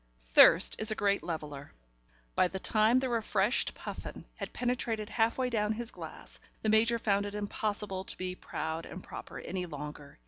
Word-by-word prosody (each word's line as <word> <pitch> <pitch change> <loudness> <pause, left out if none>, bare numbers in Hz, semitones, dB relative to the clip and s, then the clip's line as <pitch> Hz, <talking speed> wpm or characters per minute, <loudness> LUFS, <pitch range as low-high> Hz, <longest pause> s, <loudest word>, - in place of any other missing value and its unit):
Thirst - - +7
is 220 - +6
a 215 - +3
great 200 -1 +1
leveller. 150 -4 -6 0.6
By - - +4
the 190 - -5
time 215 +4 +3
the 260 0 +1
refreshed 230 -1 +1
Puffin - - -7
had - - -6
penetrated 230 -3 -1
half 225 0 +1
way 260 -1 +1
down 210 -1 +1
his 235 +1 -4
glass, - - -10 0.2
the 220 - +1
Major 225 +2 +4
found 205 -3 +1
it 205 - -7
impossible 205 -2 -2
to - - -3
be 185 0 -3
proud 160 -2 -5
and 180 - -9
proper - - -8
any 180 0 -4
longer. 150 -2 -8
210 Hz, 175 wpm, -31 LUFS, 180-225 Hz, 0.6 s, Thirst